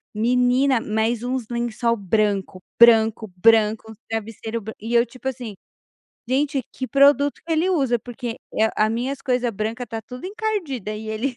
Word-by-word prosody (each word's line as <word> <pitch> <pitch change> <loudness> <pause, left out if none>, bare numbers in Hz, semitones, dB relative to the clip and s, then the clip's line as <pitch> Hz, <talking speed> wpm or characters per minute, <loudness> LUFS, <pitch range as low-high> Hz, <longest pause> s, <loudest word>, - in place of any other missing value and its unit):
menina 250 +3 +3
mas 220 +2 -1
uns 250 -1 -2
lençol 235 0 -1
branco, 200 -2 -1 0.2
branco, 225 -2 +5
branco, 220 +2 +3 0.2
travesseiro 225 +1 -4
branco 220 +1 -8
e 230 +2 -4
eu 235 0 +5
tipo 255 +2 -9
assim, 245 -5 -4 0.8
gente 275 +1 +1
que 260 - -4
produto 280 +1 +4
que 335 - -10
ele 325 +4 +2
usa, 265 -9 +1
porque 240 0 -6 0.2
é 220 0 +2
a 215 +1 +3
minhas 255 +4 -3
coisa 250 -2 0
branca 220 +3 -4
está 225 -2 -6
tudo 250 - -10
encardida 370 - -3
e 215 +1 -7
ele 235 +4 -2
235 Hz, 160 wpm, -22 LUFS, 220-260 Hz, 0.8 s, branco